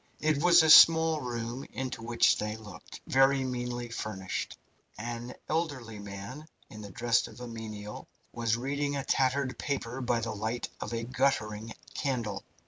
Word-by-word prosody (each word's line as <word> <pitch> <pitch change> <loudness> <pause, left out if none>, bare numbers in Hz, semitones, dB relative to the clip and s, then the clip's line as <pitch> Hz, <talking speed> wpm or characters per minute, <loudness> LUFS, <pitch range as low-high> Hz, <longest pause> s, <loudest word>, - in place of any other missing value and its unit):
It 155 -1 +1
was 175 -1 +7
a 160 - +3
small 160 -1 +8
room 120 +1 -4
into 130 0 -4
which 115 0 +3
they 105 +1 -3
looked, 105 -5 -11
very 135 0 +4
meanly 120 -1 -3
furnished. 95 -5 -4 0.4
An 120 +2 -5
elderly 145 -9 -2
man, 100 +9 -8 0.2
in 110 - -9
the 100 - -8
dress 120 +4 +1
of - - -13
a 125 - -6
menial, 110 -2 -7 0.2
was 115 -1 0
reading 140 +3 -2
a 140 - -2
tattered 135 0 +1
paper 135 -3 -3
by 120 -2 +1
the 115 -1 -3
light 110 +3 -3
of - - -5
a 115 0 -2
guttering 115 -4 -1 0.2
candle. 115 -8 -2
120 Hz, 155 wpm, -30 LUFS, 110-135 Hz, 0.4 s, small